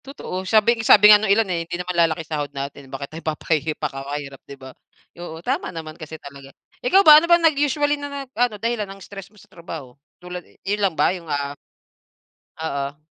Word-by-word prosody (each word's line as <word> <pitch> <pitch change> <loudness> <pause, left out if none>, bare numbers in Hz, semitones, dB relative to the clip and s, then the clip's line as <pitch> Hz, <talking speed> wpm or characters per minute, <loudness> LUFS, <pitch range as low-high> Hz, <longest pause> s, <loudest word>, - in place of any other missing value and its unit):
Totoo 270 -9 -6
sabi 225 +1 +3
sabi 210 -1 +8
nga 205 - +6
nung 215 - -1
ilan 220 +3 +4
eh 170 - -1
hindi 170 +1 -5
naman 180 0 -4
lalaki 165 -2 +1
sahod 150 -2 -3
natin 140 -1 -7
bakit 140 +2 -7
tayo 165 - -7
papahihi 155 -1 -2
pakakahirap 135 0 -5
'di 140 - -9
ba. 130 -1 -12 0.5
Oo, 165 -1 -9
tama 270 +7 -1
naman 160 -2 -7
kasi 160 -1 -9
talaga. 140 -2 -12 0.3
Ikaw 395 -6 +4
ba 305 -1 +10
ano 340 - -3
bang 340 -1 +5
naging 295 -2 +3
usually 290 +1 0
na 285 - -5 0.2
nag - - -33
ano 240 -2 0
dahilan 225 -1 -2
ng 195 - -9
stress 195 -1 -10
mo 210 - -25
sa 205 - -17
trabaho 165 -8 -10 0.3
tulad 180 0 -7
eh, - - -25
yun 205 +2 -1
lang 190 - 0
ba - - +3
yung 170 -3 -9
ah? 145 -1 -2 1.1
Oo. 140 -2 -4
175 Hz, 210 wpm, -22 LUFS, 145-220 Hz, 1.1 s, ba